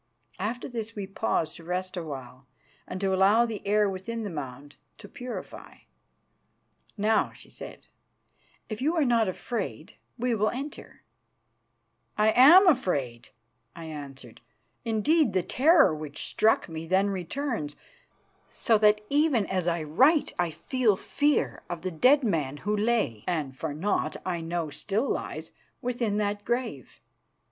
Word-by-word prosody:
After 225 +6 -3
this 230 -3 -5
we 205 -2 -4
paused 190 -5 -2
to 165 - -13
rest 185 +2 -3
a 180 - -3
while 135 -4 -9 0.4
and 185 - -5
to 195 -1 +1
allow 200 +5 +5
the 225 -3 -5
air 210 0 +3
within 200 +4 -4
the 205 - -4
mound 145 -1 -8 0.2
to - - -12
purify. 250 -1 -8 1.2
"Now," 215 +2 +2
she - - -15
said, - - -10 0.8
"if 215 +1 -6
you 310 +6 +1
are 315 -4 +2
not 230 -3 +3
afraid, 225 +5 -5 0.2
we 245 0 0
will 215 -1 +2
enter." 275 +4 -8 1.1
"I 215 +1 +4
am 335 - +8
afraid," 145 - +1 0.5
I 165 - -8
answered. 140 -6 -9 0.4
Indeed, 230 - +2
the 185 -2 +1
terror 295 - +4
which 150 -1 -6
struck 220 +1 +2
me 160 0 -7
then 190 +3 +2
returns, 190 - -3 0.8
so 225 -2 +2
that 210 0 +4
even 290 -7 +3
as 185 -2 -2
I 170 -2 0
write 265 - +3
I 175 -1 +2
feel 220 - +1
fear 290 +7 0
of 175 -1 -5
the 185 - -2
dead 260 - +4
man 150 - -1
who 210 +1 +1
lay, 210 - 0
and 155 -7 -2
for 160 +4 -4 0.2
aught 205 - 0
I 175 -2 -2
know 165 -1 -3
still 215 - -1
lies, - - -4 0.3
within 240 -5 -1
that 205 0 -1
grave. 235 - -3
205 Hz, 145 wpm, -27 LUFS, 165-240 Hz, 1.2 s, am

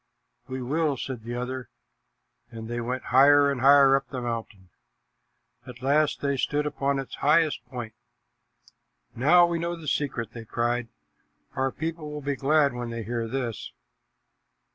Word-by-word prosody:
"We 130 -1 -5
will," 150 +2 0
said 125 -1 -5
the 120 +2 -6
other, 125 +1 -5 0.8
and 110 -1 -8
they 120 +1 -3
went 125 +2 -3
higher 140 +2 +6
and 130 -3 -3
higher 135 0 +7
up 135 0 -2
the 130 - -5
mountain. 115 -6 -6 1.0
At 125 0 -11
last 145 +2 +2
they 140 -1 0
stood 145 +3 0
upon 140 -1 -1
its 135 -1 -6
highest 155 +1 +2
point. 120 -4 -7 1.2
"Now 170 +8 +5
we 170 -1 -2
know 170 +1 -2
the 165 -2 -10
secret," 125 -7 -2
they 115 - -8
cried. 120 +2 -1 0.7
"Our 135 0 0
people 160 0 -5
will 150 0 -6
be 140 0 -1
glad 145 0 +2
when 120 -1 -5
they 115 -1 -5
hear 115 +1 -3
this." 120 -2 -4
135 Hz, 155 wpm, -26 LUFS, 120-145 Hz, 1.2 s, higher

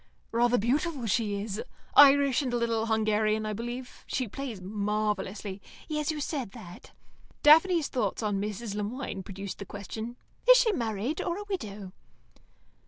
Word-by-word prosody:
"Rather 240 +1 +3
beautiful, 275 - 0
she 210 -2 0
is. 210 0 -4 0.3
Irish, 280 -2 +7
and 260 -3 -2
a - - +2
little 230 -1 0
Hungarian, 215 -1 +1
I 215 - -2
believe. 240 +3 -6
She 255 - -1
plays 245 -2 -6
marvellously." 205 0 -2 0.3
"Yes, 300 -2 -2
you 310 -1 -1
said 275 -8 -3
that." 175 0 -11 0.5
Daphne's 325 +1 +6
thoughts 245 -3 -2
on 205 -2 0
Mrs. 210 +1 -4
Le 210 - -2
Moine 215 -1 -4
produced 195 +1 -7
the - - -4
question, 220 +5 -6 0.3
"Is - - +11
she 485 -3 +4
married, 230 - -2
or 345 0 -2
a 415 - -5
widow?" 210 - -5
225 Hz, 155 wpm, -29 LUFS, 205-275 Hz, 0.5 s, Is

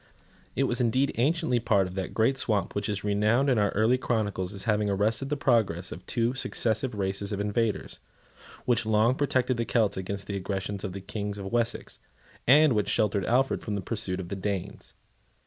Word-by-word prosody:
It 135 - +2
was 125 -2 0
indeed 130 +4 +2
anciently 155 -1 +2
part 105 -5 +2
of 90 - -7
that 95 -1 -4
great 125 +4 +2
swamp 105 -7 0
which 100 +1 -2
is 105 -1 -2
renowned 105 +7 +2
in 120 - +3
our 105 -1 +2
early 115 +5 +3
chronicles 105 -7 -1
as 100 -2 -6
having 105 -2 +1
arrested 110 +7 0
the 150 - -1
progress 110 -10 +1
of - - -8
two 120 0 0
successive 120 -2 0
races 100 0 -2
of 100 - -2
invaders, 105 +2 -1 0.7
which 120 -1 +2
long 110 +3 +3
protected 130 -3 0
the 115 - -1
Celts 110 -5 +1
against 100 +1 -4
the 100 - -4
aggressions 95 +1 -4
of 95 -4 -4
the 100 - -6
kings 105 +1 -5
of 95 -1 -6
Wessex, 115 -1 -2 0.5
and 150 +2 +6
which 105 -2 0
sheltered 100 -3 +1
Alfred 130 +3 +2
from 105 - -3
the - - -2
pursuit 95 -3 -2
of 90 -2 -6
the 100 - -3
Danes. 100 0 -5
105 Hz, 195 wpm, -27 LUFS, 100-120 Hz, 0.7 s, and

